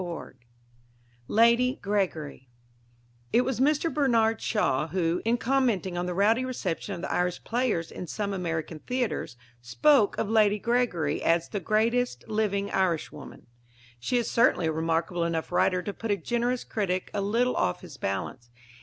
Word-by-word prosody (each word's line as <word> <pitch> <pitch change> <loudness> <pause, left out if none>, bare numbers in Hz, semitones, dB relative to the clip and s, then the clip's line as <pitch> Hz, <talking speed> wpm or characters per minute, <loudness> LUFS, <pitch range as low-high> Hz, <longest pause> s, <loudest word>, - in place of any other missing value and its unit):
XX 175 -2 -6 0.9
LADY 235 +3 +4
GREGORY 170 -10 -3 0.8
It 240 - +4
was 255 -1 -2
Mr. 300 +4 +2
Bernard 230 -6 +2
Shaw 150 - 0
who, 170 0 0
in 230 +2 +2
commenting 235 -8 0
on 175 +1 -2
the 180 - -3
rowdy 220 +6 +3
reception 255 -10 -3
of - - -8
the - - -3
Irish 180 0 -1
players 230 -9 -1
in 180 - -7
some 200 +4 -3
American 165 -3 -3
theatres, 245 - -3 0.2
spoke 215 - +3
of - - -1
Lady 210 -1 +3
Gregory 210 -10 0
as 165 0 +1
"the 205 - -3
greatest 230 +7 0
living 210 -2 -1
Irishwoman." 180 -4 -2 0.5
She 185 - 0
is 240 - 0
certainly 230 -7 +3
a 160 - +1
remarkable 165 +2 -1
enough 165 -1 -2
writer 180 -1 +2
to 205 - -4
put 225 - -6
a 205 - +2
generous 240 +6 -1
critic 185 -4 -2
a 205 - -1
little 235 +5 +1
off 90 - 0
his - - -11
balance. 100 +5 -4
200 Hz, 155 wpm, -27 LUFS, 170-235 Hz, 0.9 s, LADY